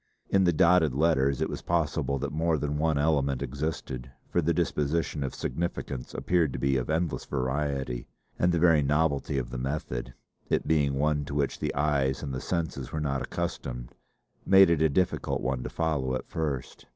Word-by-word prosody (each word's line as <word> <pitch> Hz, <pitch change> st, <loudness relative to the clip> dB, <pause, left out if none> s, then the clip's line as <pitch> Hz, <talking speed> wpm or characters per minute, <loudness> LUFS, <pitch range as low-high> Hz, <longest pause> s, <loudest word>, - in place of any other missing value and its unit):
In 95 Hz, -1 st, +4 dB
the 90 Hz, -, +5 dB
dotted 85 Hz, -3 st, +4 dB
letters 70 Hz, -3 st, +2 dB
it -, -, +2 dB
was -, -, -5 dB
possible 75 Hz, -4 st, 0 dB
that 70 Hz, +1 st, -3 dB
more 80 Hz, +1 st, +1 dB
than 75 Hz, 0 st, -2 dB
one 80 Hz, -1 st, +2 dB
element 70 Hz, -3 st, +1 dB
existed, 70 Hz, -2 st, -4 dB, 0.2 s
for 85 Hz, -, +2 dB
the 85 Hz, +1 st, +1 dB
disposition 80 Hz, -2 st, 0 dB
of 65 Hz, -, -4 dB
significants 70 Hz, -3 st, -4 dB
appeared 85 Hz, -7 st, +1 dB
to -, -, -3 dB
be 70 Hz, +2 st, +1 dB
of 65 Hz, 0 st, -1 dB
endless 80 Hz, +1 st, 0 dB
variety, 65 Hz, -2 st, -2 dB, 0.3 s
and 90 Hz, -, +3 dB
the 85 Hz, -, +1 dB
very 80 Hz, -2 st, +5 dB
novelty 70 Hz, -1 st, +1 dB
of -, -, -3 dB
the 65 Hz, -, -4 dB
method 65 Hz, -2 st, -3 dB, 0.3 s
it -, -, +1 dB
being 70 Hz, -3 st, +2 dB
one 75 Hz, +1 st, +1 dB
to 70 Hz, -, -6 dB
which 70 Hz, -2 st, 0 dB
the -, -, -2 dB
eyes 70 Hz, -2 st, +1 dB
and 70 Hz, -2 st, -4 dB
the 65 Hz, -, -3 dB
senses 80 Hz, -7 st, -3 dB
were 80 Hz, -, -2 dB
not 70 Hz, -3 st, -1 dB
accustomed -, -, -4 dB, 0.5 s
made 95 Hz, -2 st, +7 dB
it 80 Hz, -2 st, +2 dB
a 80 Hz, -, +4 dB
difficult 90 Hz, +5 st, 0 dB
one 65 Hz, 0 st, -1 dB
to -, -, -4 dB
follow 75 Hz, -6 st, -1 dB
at -, -, -5 dB
first. 75 Hz, -6 st, -4 dB
75 Hz, 190 wpm, -28 LUFS, 65-80 Hz, 0.5 s, made